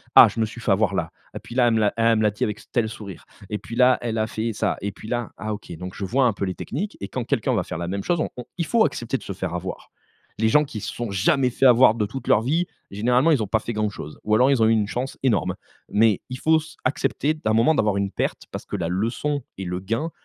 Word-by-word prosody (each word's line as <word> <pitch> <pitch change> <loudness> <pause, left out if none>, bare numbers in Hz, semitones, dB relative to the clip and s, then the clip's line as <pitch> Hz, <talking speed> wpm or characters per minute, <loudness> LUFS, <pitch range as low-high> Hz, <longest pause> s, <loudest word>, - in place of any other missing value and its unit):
«Ah - - +11
je - - -5
me 110 - +3
suis 115 +2 -9
fait 110 - 0
avoir 100 +1 +2
là 85 -3 -2 0.2
et - - -4
puis 120 - -11
là 125 -2 +4
elle 115 - +3
me 110 - +2
l'a 105 -2 +2
elle 115 0 +4
me 110 - +1
l'a 105 - +3
dit 105 - -3
avec 105 0 -2
ce - - -17
tel 115 -3 +1
sourire. 100 -5 -9 0.2
Et 105 - -2
puis 115 - -8
là, 125 0 +5
elle 115 -2 -2
a 110 - +1
fait 115 +1 -3
ça - - -1
et 100 - -2
puis 105 - -12
là 120 -1 -2
ah 110 0 -3
OK», 105 -3 -9
donc 90 +2 -7
je 100 - -4
vois 125 +7 +2
un 120 - +3
peu 100 - -3
les 95 -1 -3
techniques 200 +10 -4
et 100 - -3
quand 125 - -3
quelqu'un 130 -1 0
va 95 - +1
faire 90 - -6
la 85 - -3
même 100 +2 -3
chose 175 -2 0
on - - -1
on, 125 - -6
il 170 - -1
faut 230 +6 +3
accepter 120 +3 -2
de - - -13
se 100 - -5
faire 90 -2 -4
avoir. 90 - -6 0.5
Les 110 - +3
gens 150 +7 +5
qui 130 -7 -6
se - - -5
sont 120 -3 -4
jamais 125 +7 +2
fait 125 - 0
avoir 125 -3 +7
de 110 -2 0
toute 120 +4 -7
leur 110 - +5
vie, 155 +9 +1 0.3
généralement 125 +9 +3
ils 135 -8 +3
ont - - -4
pas 110 +3 +1
fait 120 - -5
grand 105 -1 0
chose, 75 -6 -9
ou 105 0 +2
alors 125 +4 +5
ils 135 -4 +3
ont - - +5
eu - - +4
une 110 -2 +2
chance 125 +5 -4
énorme. 100 -8 +1 0.3
Mais 105 -2 +3
il 130 - -5
faut 160 +2 +4
se 155 +1 -12
accepter 145 +3 0
à - - +2
un - - +3
moment 115 +8 +4
d'avoir 105 -5 +2
une 100 0 0
perte - - -2
parce - - -6
que - - -4
la 85 -3 -2
leçon 115 - -1
et 95 - -5
le 90 0 -3
gain 115 - -2
110 Hz, 300 wpm, -23 LUFS, 100-130 Hz, 0.5 s, Ah